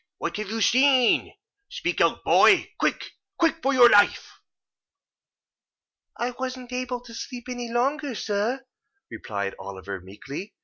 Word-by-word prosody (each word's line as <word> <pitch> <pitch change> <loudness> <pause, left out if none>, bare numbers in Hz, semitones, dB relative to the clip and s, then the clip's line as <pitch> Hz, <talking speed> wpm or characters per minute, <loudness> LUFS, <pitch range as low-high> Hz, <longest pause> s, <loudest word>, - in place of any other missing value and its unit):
What - - -4
have 210 -2 -5
you 225 +1 -3
seen? 255 0 +4 0.4
Speak - - -2
out, - - +2
boy! - - +5
Quick—quick! 330 -1 -2
for 275 - +1
your 250 -3 +7
life." 205 -3 +3 1.9
"I 240 +1 -2
wasn't 255 -1 -5
able 250 -1 -3
to 240 -1 -13
sleep 245 +1 -8
any 245 -1 -5
longer, 270 +2 -1
sir," 220 +6 -2 0.5
replied 100 -3 -4
Oliver, 95 0 -7
meekly. 135 - -9
240 Hz, 125 wpm, -25 LUFS, 205-255 Hz, 1.9 s, your